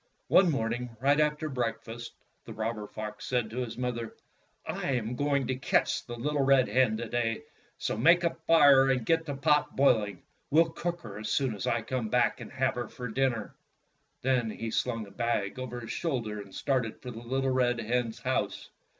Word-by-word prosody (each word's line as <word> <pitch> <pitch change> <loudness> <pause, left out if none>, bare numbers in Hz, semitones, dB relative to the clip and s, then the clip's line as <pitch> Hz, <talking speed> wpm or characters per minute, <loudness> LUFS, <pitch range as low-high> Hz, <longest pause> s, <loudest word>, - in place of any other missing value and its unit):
One 185 -1 +6
morning, 120 -3 -2
right 140 +3 +3
after 150 0 +1
breakfast, 120 -3 -4 0.3
the - - -8
robber 110 -1 -3
fox 105 0 -7
said 120 -4 0
to 115 - -7
his 125 -3 -3
mother: 120 -2 -3 0.5
"I 135 - -2
am 120 -1 -2
going 140 0 +1
to 130 - -1
catch 130 - +1
the 120 - -5
little 145 +4 -1
red 135 -2 +4
hen 125 -4 +2
to 115 +1 -4
day. 115 -1 -1 0.3
So - - -2
make 170 +10 +5
a 170 - +2
fire, 145 -5 +7
and 125 -4 +1
get 165 +2 +2
the 145 - -3
pot 150 +2 +2
boiling. 110 -7 +2 0.3
We 155 +3 +6
'll 165 - +2
cook 175 +1 -3
her 105 -3 -8
as 110 - -4
soon 135 -5 +1
as 100 - -4
I 120 -1 +1
come 120 -1 -2
back 125 +2 +2
and - - -8
have 130 0 +1
her 120 -2 -4
for 125 -1 -7
dinner." 120 -2 -1 0.7
Then 125 -3 +2
he 115 +1 -5
slung 115 -2 -1
a 100 - -14
bag 115 -2 -1
over 125 -1 -5
his 115 - -6
shoulder 115 -10 -2
and 100 -1 -13
started 125 -5 -1
for 125 - -7
the 115 - -8
little 130 +2 -1
red 125 -2 +2
hen's 115 0 -1
house. - - -2
125 Hz, 200 wpm, -29 LUFS, 115-135 Hz, 0.7 s, fire